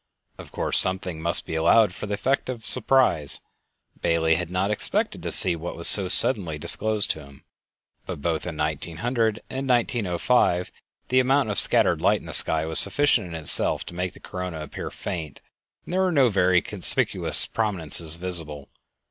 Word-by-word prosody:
Of -, -, -12 dB
course, -, -, 0 dB
something 95 Hz, -3 st, 0 dB
must 85 Hz, +1 st, 0 dB
be -, -, -7 dB
allowed 90 Hz, +5 st, +3 dB
for 105 Hz, -, -7 dB
the 100 Hz, -, -2 dB
effect 130 Hz, +6 st, -2 dB
of 120 Hz, -3 st, -6 dB
surprise; 125 Hz, -, +1 dB, 0.6 s
Bailey 80 Hz, -1 st, +1 dB
had 85 Hz, +1 st, -3 dB
not 95 Hz, +3 st, -1 dB
expected 105 Hz, -, -2 dB
to -, -, -5 dB
see -, -, +4 dB
what 85 Hz, +1 st, -7 dB
was 85 Hz, -, +3 dB
so 100 Hz, -3 st, +6 dB
suddenly 90 Hz, -6 st, +3 dB
disclosed 110 Hz, +7 st, 0 dB
to 80 Hz, -, -6 dB
him. 70 Hz, -1 st, -17 dB, 0.6 s
But -, -, -6 dB
both 80 Hz, +3 st, -3 dB
in 80 Hz, -3 st, -6 dB
1900 95 Hz, -, -2 dB
and 135 Hz, +1 st, -5 dB
1905 110 Hz, -5 st, 0 dB, 0.4 s
the 130 Hz, +1 st, +3 dB
amount 130 Hz, -2 st, +1 dB
of 100 Hz, -, +1 dB
scattered -, -, +2 dB
light -, -, +2 dB
in -, -, -15 dB
the -, -, -8 dB
sky 80 Hz, 0 st, +1 dB
was 80 Hz, 0 st, +2 dB
sufficient 140 Hz, -9 st, +1 dB
in 85 Hz, -, -8 dB
itself 80 Hz, -2 st, 0 dB
to -, -, -9 dB
make 90 Hz, +1 st, -4 dB
the -, -, -16 dB
corona 90 Hz, -4 st, -7 dB
appear 75 Hz, -, -7 dB
faint, 85 Hz, -7 st, -7 dB, 0.5 s
and -, -, -8 dB
there 190 Hz, -, +1 dB
were 185 Hz, -1 st, +1 dB
no 135 Hz, -6 st, +3 dB
very 90 Hz, -3 st, +2 dB
conspicuous -, -, +1 dB
prominences 85 Hz, -7 st, +1 dB
visible. 80 Hz, -5 st, -4 dB
90 Hz, 175 wpm, -23 LUFS, 80-115 Hz, 0.6 s, so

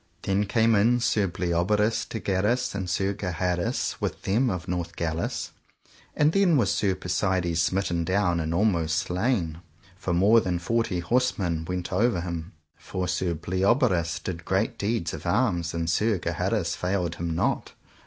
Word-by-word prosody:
Then 100 Hz, +1 st, +1 dB
came 115 Hz, +2 st, +3 dB
in 115 Hz, +4 st, +4 dB
Sir 105 Hz, -4 st, +2 dB
Bleoberis 90 Hz, +5 st, 0 dB
de 110 Hz, -, -4 dB
Ganis 105 Hz, +6 st, 0 dB
and 95 Hz, -2 st, -3 dB
Sir 95 Hz, +2 st, 0 dB
Gaheris 90 Hz, -2 st, -2 dB
with -, -, -3 dB
them 120 Hz, +7 st, +2 dB
of 90 Hz, -5 st, -4 dB
Northgalis, 85 Hz, -2 st, -3 dB, 0.6 s
and 150 Hz, +1 st, +4 dB
then 185 Hz, -4 st, +4 dB
was 105 Hz, -7 st, +2 dB
Sir 95 Hz, -3 st, +1 dB
Persides 90 Hz, -2 st, 0 dB
smitten 85 Hz, -1 st, 0 dB
down 90 Hz, -1 st, +1 dB
and 80 Hz, 0 st, -2 dB
almost 85 Hz, -4 st, +1 dB
slain, 90 Hz, -2 st, -1 dB, 0.4 s
for 95 Hz, 0 st, -4 dB
more 100 Hz, +7 st, +5 dB
than 90 Hz, -3 st, -1 dB
forty 105 Hz, 0 st, -1 dB
horse 125 Hz, +8 st, +1 dB
men 85 Hz, -4 st, -2 dB
went 90 Hz, +1 st, -4 dB
over 105 Hz, -1 st, +2 dB
him. 85 Hz, 0 st, -5 dB, 0.2 s
For 90 Hz, -1 st, -4 dB
Sir 90 Hz, 0 st, -1 dB
Bleoberis 95 Hz, -, +1 dB
did 85 Hz, -2 st, -5 dB
great 95 Hz, +4 st, -1 dB
deeds 105 Hz, -5 st, -1 dB
of -, -, -6 dB
arms, 90 Hz, -8 st, +1 dB
and 85 Hz, -1 st, -2 dB
Sir 105 Hz, +6 st, +2 dB
Gaheris 90 Hz, +1 st, -1 dB
failed 90 Hz, -2 st, -1 dB
him 85 Hz, -1 st, -2 dB
not. 85 Hz, -, -1 dB
95 Hz, 155 wpm, -26 LUFS, 85-105 Hz, 0.6 s, more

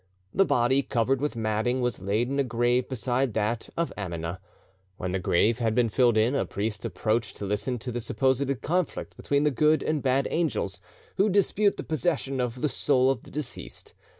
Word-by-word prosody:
The 195 Hz, -, +4 dB
body, 130 Hz, 0 st, +3 dB
covered 130 Hz, 0 st, 0 dB
with 150 Hz, -3 st, -1 dB
matting, 110 Hz, +3 st, 0 dB
was 125 Hz, -6 st, -1 dB
laid 105 Hz, +5 st, 0 dB
in 140 Hz, +2 st, -1 dB
a -, -, +4 dB
grave 120 Hz, 0 st, +1 dB
beside 130 Hz, -1 st, -1 dB
that 110 Hz, +1 st, -1 dB
of 170 Hz, 0 st, -1 dB
Amina. 85 Hz, -2 st, -4 dB, 0.6 s
When 90 Hz, -, -3 dB
the 95 Hz, -, -1 dB
grave 100 Hz, +5 st, +2 dB
had 110 Hz, -2 st, +1 dB
been 120 Hz, -2 st, +3 dB
filled 120 Hz, 0 st, +3 dB
in, 110 Hz, +4 st, +3 dB
a 140 Hz, -, +1 dB
priest 105 Hz, +1 st, -3 dB
approached 110 Hz, -2 st, -1 dB
to 100 Hz, -, -5 dB
listen 105 Hz, +5 st, -1 dB
to 125 Hz, +2 st, -5 dB
the 120 Hz, 0 st, -3 dB
supposed 130 Hz, +2 st, 0 dB
conflict 175 Hz, +1 st, -1 dB
between 140 Hz, 0 st, 0 dB
the 150 Hz, -, +3 dB
good 150 Hz, +4 st, +3 dB
and 155 Hz, -2 st, 0 dB
bad 135 Hz, +1 st, +2 dB
angels, 165 Hz, -1 st, -1 dB, 0.4 s
who 200 Hz, +2 st, +4 dB
dispute 200 Hz, +1 st, +2 dB
the -, -, -4 dB
possession 155 Hz, -4 st, -1 dB
of 125 Hz, 0 st, -2 dB
the -, -, +2 dB
soul 135 Hz, -2 st, +2 dB
of 130 Hz, -, -3 dB
the -, -, -15 dB
deceased. 145 Hz, -4 st, -5 dB
125 Hz, 195 wpm, -27 LUFS, 110-140 Hz, 0.6 s, The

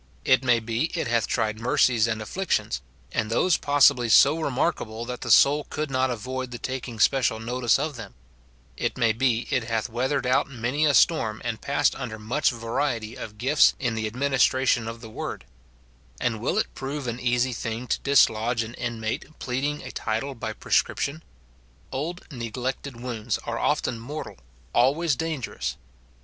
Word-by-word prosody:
It 130 Hz, 0 st, +4 dB
may 120 Hz, -2 st, +4 dB
be 115 Hz, +4 st, -1 dB
it 165 Hz, -, -1 dB
hath 115 Hz, -2 st, +1 dB
tried 110 Hz, 0 st, -1 dB
mercies 115 Hz, -1 st, +3 dB
and 110 Hz, -1 st, -2 dB
afflictions, 110 Hz, -, -1 dB, 0.3 s
and 110 Hz, -, -1 dB
those 160 Hz, +9 st, +3 dB
possibly 140 Hz, -4 st, +4 dB
so 140 Hz, +8 st, +6 dB
remarkable 125 Hz, -6 st, -1 dB
that 125 Hz, 0 st, -6 dB
the 120 Hz, -, -5 dB
soul 140 Hz, +6 st, +5 dB
could 155 Hz, -2 st, -3 dB
not 130 Hz, 0 st, +1 dB
avoid 130 Hz, +2 st, -4 dB
the 120 Hz, -, -6 dB
taking 125 Hz, -2 st, -5 dB
special 125 Hz, -2 st, +3 dB
notice 120 Hz, 0 st, +1 dB
of 145 Hz, -1 st, -3 dB
them; -, -, -9 dB, 0.6 s
it 120 Hz, -, -2 dB
may 115 Hz, -3 st, +3 dB
be 120 Hz, 0 st, +1 dB
it 125 Hz, -5 st, +1 dB
hath 115 Hz, 0 st, -1 dB
weathered 130 Hz, +3 st, -1 dB
out 130 Hz, +2 st, +2 dB
many 130 Hz, +4 st, 0 dB
a 145 Hz, -, +3 dB
storm, 115 Hz, -11 st, +3 dB
and 115 Hz, -2 st, -3 dB
passed 140 Hz, 0 st, +2 dB
under 120 Hz, -5 st, -6 dB
much 120 Hz, +8 st, +1 dB
variety 115 Hz, -1 st, -2 dB
of 105 Hz, -4 st, -8 dB
gifts 135 Hz, +6 st, +4 dB
in 125 Hz, -3 st, 0 dB
the 110 Hz, -1 st, -2 dB
adminis 135 Hz, +3 st, +3 dB
tration 125 Hz, -3 st, +1 dB
of 115 Hz, 0 st, -6 dB
the 115 Hz, -, -9 dB
word; -, -, -5 dB, 0.7 s
and 115 Hz, -3 st, -1 dB
Avill 140 Hz, -, 0 dB
it -, -, -2 dB
prove 140 Hz, +1 st, -5 dB
an 120 Hz, 0 st, -3 dB
easy 125 Hz, +1 st, +1 dB
thing 115 Hz, +1 st, -4 dB
to -, -, -1 dB
dislodge 115 Hz, -4 st, +3 dB
an 110 Hz, +1 st, -8 dB
inmate 120 Hz, +4 st, -4 dB
pleading 140 Hz, +4 st, -2 dB
a -, -, -7 dB
title 115 Hz, +6 st, -2 dB
by 115 Hz, -, -5 dB
prescription? 145 Hz, +3 st, 0 dB, 0.7 s
Old 160 Hz, +7 st, -4 dB
neglected 125 Hz, +1 st, -4 dB
wounds 120 Hz, -2 st, -3 dB
are -, -, -3 dB
often 115 Hz, -, 0 dB
mortal, 145 Hz, +7 st, -7 dB, 0.4 s
always 140 Hz, +5 st, +3 dB
dangerous. 130 Hz, -, -3 dB
125 Hz, 170 wpm, -25 LUFS, 115-140 Hz, 0.7 s, so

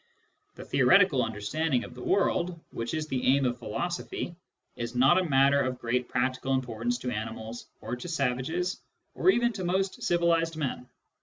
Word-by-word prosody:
The -, -, -9 dB
theoretical 130 Hz, -, +4 dB
understanding 120 Hz, +6 st, -1 dB
of -, -, -9 dB
the 125 Hz, -, -10 dB
world, 180 Hz, 0 st, +1 dB
which 115 Hz, +5 st, -3 dB
is 155 Hz, -1 st, -2 dB
the 130 Hz, -4 st, -2 dB
aim 135 Hz, +1 st, +4 dB
of 120 Hz, 0 st, -1 dB
philosophy, 175 Hz, +8 st, -4 dB, 0.4 s
is 120 Hz, +1 st, -5 dB
not 135 Hz, +9 st, +5 dB
a -, -, +1 dB
matter 140 Hz, +1 st, +4 dB
of 130 Hz, -1 st, -1 dB
great 120 Hz, +1 st, -1 dB
practical 130 Hz, +2 st, 0 dB
importance 120 Hz, -1 st, -2 dB
to 125 Hz, 0 st, -4 dB
animals, 110 Hz, +1 st, -5 dB
or -, -, -4 dB
to 125 Hz, -, -8 dB
savages, 160 Hz, +4 st, -1 dB, 0.3 s
or -, -, +2 dB
even 240 Hz, -9 st, +3 dB
to 195 Hz, -3 st, -5 dB
most 190 Hz, +2 st, -1 dB
civilised 165 Hz, -1 st, +2 dB
men. 130 Hz, -4 st, -3 dB
135 Hz, 165 wpm, -28 LUFS, 125-170 Hz, 0.4 s, not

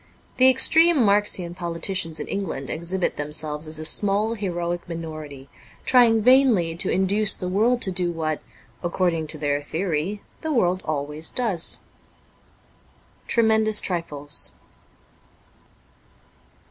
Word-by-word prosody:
The 260 Hz, 0 st, +7 dB
extreme 320 Hz, +1 st, +5 dB
Marxian 200 Hz, -4 st, +1 dB
politicians 170 Hz, -1 st, -1 dB
in -, -, -5 dB
England 165 Hz, -9 st, -4 dB
exhibit 175 Hz, +3 st, -2 dB
themselves 150 Hz, +1 st, -2 dB
as 155 Hz, 0 st, -5 dB
a 155 Hz, -, -3 dB
small, 205 Hz, +5 st, +2 dB
heroic 175 Hz, -5 st, -4 dB
minority, 155 Hz, -5 st, -8 dB, 0.4 s
trying 235 Hz, -4 st, +4 dB
vainly 240 Hz, -10 st, +4 dB
to -, -, -1 dB
induce 195 Hz, +3 st, +2 dB
the 180 Hz, -, -5 dB
world 225 Hz, +6 st, +1 dB
to 190 Hz, -, -2 dB
do 180 Hz, -1 st, -1 dB
what, 155 Hz, -2 st, -3 dB, 0.4 s
according 175 Hz, -2 st, -1 dB
to 155 Hz, -, -4 dB
their 145 Hz, -1 st, -1 dB
theory, 170 Hz, +5 st, -3 dB, 0.2 s
the 315 Hz, -, -3 dB
world 185 Hz, -8 st, +1 dB
always 150 Hz, +1 st, -3 dB
does. 210 Hz, -9 st, -1 dB, 0.7 s
' -, -, -34 dB
Tremendous 220 Hz, -2 st, +3 dB
Trifles. 150 Hz, -5 st, -3 dB
180 Hz, 120 wpm, -23 LUFS, 155-210 Hz, 0.7 s, The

